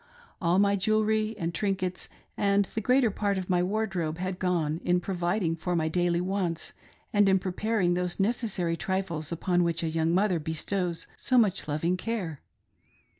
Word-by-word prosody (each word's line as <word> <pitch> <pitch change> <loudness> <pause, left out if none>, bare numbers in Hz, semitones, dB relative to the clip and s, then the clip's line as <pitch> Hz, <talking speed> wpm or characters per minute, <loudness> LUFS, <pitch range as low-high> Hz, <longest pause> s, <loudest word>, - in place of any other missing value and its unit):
All 175 0 +2
my 200 0 +4
jewelry 215 +2 +1
and 170 -2 -2
trinkets 185 0 -2 0.3
and 200 0 +2
the 220 - -4
greater 250 +1 +3
part 200 0 -1
of 185 0 -3
my 175 -1 +3
wardrobe 185 -5 -1
had 185 +1 -3
gone 170 -4 0
in 180 0 +2
providing 175 -1 -1
for 175 +2 -2
my 160 -1 +1
daily 175 +1 +1
wants 180 -2 -2 0.4
and 205 -1 +5
in 190 - +5
preparing 190 0 0
those 180 0 -2
necessary 195 -5 0
trifles 170 -4 -2
upon 175 +1 +1
which 170 -1 0
a 165 - 0
young 160 0 +1
mother 185 -1 +2
bestows 170 +3 -2
so 255 - +1
much 205 -8 +2
loving 165 +4 0
care. 185 -9 -4
180 Hz, 165 wpm, -28 LUFS, 170-200 Hz, 0.4 s, and